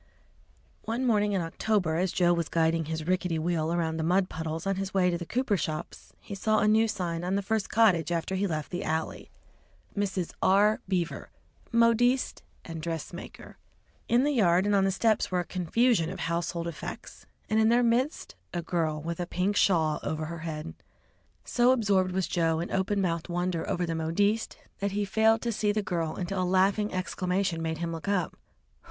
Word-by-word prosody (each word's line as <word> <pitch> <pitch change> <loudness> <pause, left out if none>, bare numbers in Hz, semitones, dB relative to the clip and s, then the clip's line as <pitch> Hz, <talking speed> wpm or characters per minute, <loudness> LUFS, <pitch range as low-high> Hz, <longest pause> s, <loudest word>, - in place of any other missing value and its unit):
One 235 +4 -1
morning 210 -3 +2
in 190 - +1
October, 170 0 0
as 180 +1 0
Joe 175 -1 +3
was 170 -2 -1
guiding 165 0 +1
his 160 0 -4
rickety 180 -1 0
wheel 160 0 0
around 165 -2 -1
the 160 - -1
mud 185 +3 +2
puddles 160 +1 -4
on 195 -1 0
his 195 0 -4
way 180 -2 +3
to 170 - -1
the 170 - -6
cooper 245 -4 0
shops, 155 0 -5
he 210 - -9
saw 215 +2 +1
a 210 - +3
new 220 +1 +4
sign 175 -5 -3
on 185 +2 0
the 200 - 0
first 220 +1 -1
cottage 185 -8 +3
after 170 +2 -1
he 195 +1 0
left 155 -4 -4
the 180 +1 -3
alley 160 +1 -3 0.7
"Mrs. 190 -4 -2
R. 205 +3 +4
Beaver, 180 -3 -2 0.4
Modiste 235 +2 +3 0.2
& 165 -1 -6
Dress 165 0 -4
Maker." 175 - -10 0.5
In 240 +2 +3
the 295 - +2
yard 185 -7 +3
and 205 - +2
on 195 -1 +3
the 195 - +2
steps 215 +3 +1
were 180 -1 +1
a - - -7
confusion 185 +2 +1
of 185 - -6
household 170 0 -2
effects, 165 -3 -8 0.2
and 215 0 +2
in 220 0 +4
their 240 +1 +4
midst 245 +6 0 0.2
a 175 - -2
girl 160 -3 -1
with 170 +1 -4
a 175 - -2
pink 185 +3 0
shawl 160 -7 +3
over 155 0 -3
her 170 +1 -6
head. 160 0 -5 0.7
So 245 +1 +3
absorbed 200 -7 +2
was 185 0 0
Joe 165 -2 +1
in 170 - -4
open 195 +1 0
mouthed 170 -2 -1
wonder 175 -1 -2
over 175 - 0
the 165 - -2
"Modiste," 200 +7 0 0.2
that 200 0 -1
he 205 0 0
failed 220 +2 +3
to 235 - 0
see 210 -1 +1
the 210 0 -1
girl, 165 -4 -2
until 185 +1 -2
a - - +1
laughing 195 +3 +2
exclamation 185 -1 -1
made 160 0 -2
him 170 +1 -3
look 165 +3 -6
up. 195 -5 0
185 Hz, 195 wpm, -28 LUFS, 165-205 Hz, 0.7 s, new